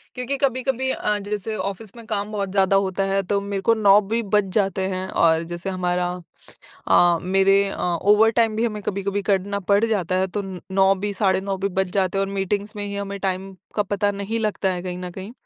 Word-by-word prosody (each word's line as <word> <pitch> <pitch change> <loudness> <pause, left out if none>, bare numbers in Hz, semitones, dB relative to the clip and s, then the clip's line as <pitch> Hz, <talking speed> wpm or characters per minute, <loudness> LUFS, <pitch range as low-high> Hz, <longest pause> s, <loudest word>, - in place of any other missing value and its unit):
क्योंकि 250 +2 -3
कभी-कभी 260 -1 0
अ, 210 -4 -1
जैसे 210 +1 -4
ऑफ़िस 200 +3 -5
में 230 - -11
काम 210 -1 -3
बहुत 200 -2 -2
ज़्यादा 195 0 +3
होता 195 0 +1
है 195 0 +1
तो 200 +2 0
मेरे 200 -1 -3
को 230 +4 +4
9 205 -2 +6
भी 225 +4 -1
बज 205 -2 +2
जाते 195 -3 +1
हैं 185 0 -3
और 165 -2 +3
जैसे 175 +3 -4
हमारा 180 -1 -1 0.8
अ, 175 -1 +5
मेरे 195 +2 +4
अ, - - -7
ओवर 205 +6 +4
टाइम 225 -2 +2
भी 225 - +1
हमें 210 -3 -2
कभी-कभी 200 0 -2
करना 200 0 0
पड़ 200 +2 +4
जाता 195 -6 0
है 190 - +2
तो 205 +2 -3 0.3
9 195 0 +4
भी, 205 +2 -3
साढ़े 190 -1 +2
9 195 0 -3
भी 195 - -1
बज 190 -1 -1
जाते 195 -1 +1
हैं 195 - +2
और 195 - -6
मीटिंग्स 200 +2 -2
में 205 - -3
ही 200 - -5
हमें 200 0 -4
टाइम 190 0 -2 0.2
का 210 - +3
पता 205 0 0
नहीं 200 +3 -3
लगता 205 -3 0
है 180 -1 -4
कहीं 180 -1 -4
न 180 0 -5
कहीं। 190 +5 -8
200 Hz, 220 wpm, -22 LUFS, 190-210 Hz, 0.8 s, 9